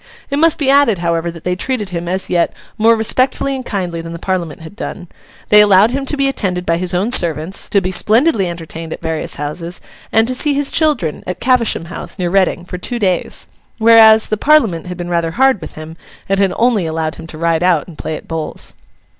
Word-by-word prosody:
It 280 - 0
must 325 0 +4
be 275 -3 +2
added, 280 -7 +4
however, 170 0 -1
that 165 -1 -10
they 180 0 -1
treated 215 0 -3
him, 170 -1 -5
as 185 +2 -2
yet, 175 -1 0 0.2
more 225 +1 +4
respectfully 255 +5 +1
and 260 - -5
kindly 180 -7 -3
than 165 0 -8
the - - -6
Parliament 170 -4 -3
had 160 +5 -11
done. 180 -4 -7 0.4
They 210 0 +8
allowed 205 +2 +5
him 275 +1 -3
to 295 - -1
be 275 0 +2
attended 185 -9 -2
by 165 0 +1
his 180 0 -2
own 200 +7 0
servants, 165 - 0
to 200 - +2
be 185 0 -2
splendidly 220 - +3
entertained 165 -1 -7
at - - -10
various 160 -1 -3
houses, 165 +4 -5 0.3
and 225 +1 +3
to 255 - 0
see 285 +2 +1
his 285 0 +1
children—at 205 - -1
Cavesham 240 -9 +1
House, 170 - -7
near 175 -3 -2
Reading—for 180 -2 0
two 240 +6 -3
days. 185 -6 -1 0.3
Whereas, 220 -1 +6
the 215 - 0
Parliament 220 - +2
had 180 -1 -6
been 175 -1 -5
rather 170 -1 0
hard 265 -5 +3
with - - -9
him, 155 +1 -9 0.3
and 195 0 0
had 195 -2 +2
only 225 -7 +1
allowed 160 0 -3
him 165 - -10
to 160 - -9
ride 165 0 0
out 175 -4 +2
and 175 - -12
play 155 - -5
at - - -10
bowls. 160 -2 -4
185 Hz, 215 wpm, -16 LUFS, 170-230 Hz, 0.4 s, They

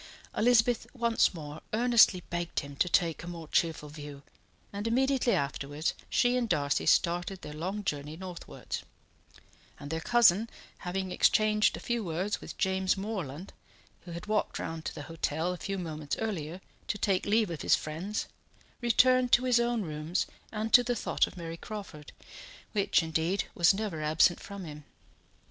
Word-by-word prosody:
Elizabeth 235 0 +3
once 235 -2 +3
more 155 -3 -8
earnestly 230 -5 +5
begged 175 -1 -2
him 140 0 -9
to 180 - +1
take 170 -2 +2
a 170 - -9
more 170 -2 -7
cheerful 160 -1 0
view, 145 -1 -9 0.5
and 205 +2 -3
immediately 260 +1 +2
afterwards 140 +2 -1 0.2
she 245 0 +3
and 245 -2 0
Darcy 145 -5 +1
started 175 +2 +2
their 150 - -7
long 185 +7 -4
journey 150 -3 -3
northwards; 180 -1 -6 1.0
and 145 +1 -7
their 160 0 -2
cousin, 230 0 +4 0.3
having 185 +1 -3
exchanged 215 +3 +3
a - - -8
few 235 -2 -2
words 180 +4 -2
with - - -9
James 190 0 +1
Morland, 190 -5 -5 0.5
who 175 - -8
had 170 +4 -6
walked 210 0 0
round 160 -1 -5
to - - -4
the 145 - -6
hotel 165 +2 -2
a - - -6
few 195 +2 -4
moments 155 -5 -4
earlier 185 -5 -4 0.3
to - - -1
take 195 -1 0
leave 215 -2 +2
of 165 - -5
his - - +4
friends, 175 +8 -4 0.6
returned 250 +1 +4
to 245 - +6
his 250 -2 +4
own 235 -2 +1
rooms 155 +1 -2 0.3
and 220 0 -3
to 245 - +9
the 245 0 -1
thought - - +1
of - - -12
Mary 165 -1 -6
Crawford, 190 -8 -8 0.6
which, 200 -4 +2
indeed, 165 +4 0
was 170 -1 +5
never 195 -6 -3
absent 155 +3 +3
from 200 -1 -8
him. 150 -1 -9
185 Hz, 165 wpm, -30 LUFS, 160-215 Hz, 1.0 s, to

